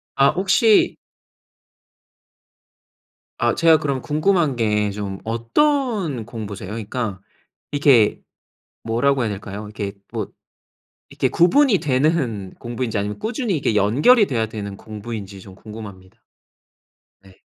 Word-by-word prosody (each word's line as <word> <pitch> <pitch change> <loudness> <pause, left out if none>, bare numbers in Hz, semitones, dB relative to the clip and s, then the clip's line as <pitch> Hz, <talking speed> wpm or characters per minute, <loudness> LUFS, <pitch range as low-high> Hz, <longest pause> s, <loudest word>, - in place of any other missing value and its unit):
아 135 0 +5
혹시 200 +4 +3 2.4
아 - - +2
제가 165 -1 +5
그럼 140 -4 -2
궁금한 155 -2 +1
게 105 -2 +1
좀 100 -1 -5
어떤 170 - 0
공부세요? 105 -5 -7
그러니까 110 -2 -4 0.5
이렇게 140 -7 +4 0.6
뭐라고 125 +4 +1
해야 115 - 0
될까요? 100 +1 -6
이렇게 105 -1 -5 0.2
뭐 - - -3 0.8
이렇게 - - 0
구분이 205 +5 +4
되는 130 - 0
공부인지 120 -1 -3
아니면 105 +1 -3
꾸준히 220 - -2
이게 125 -6 0
연결이 145 - +4
돼야 115 -4 0
되는 100 -3 -7
공부인지 105 -3 -8
좀 95 -1 -13
궁금합니다. 100 -4 -11 1.0
네. 95 -1 -20
115 Hz, 260 characters per minute, -21 LUFS, 105-155 Hz, 2.4 s, 아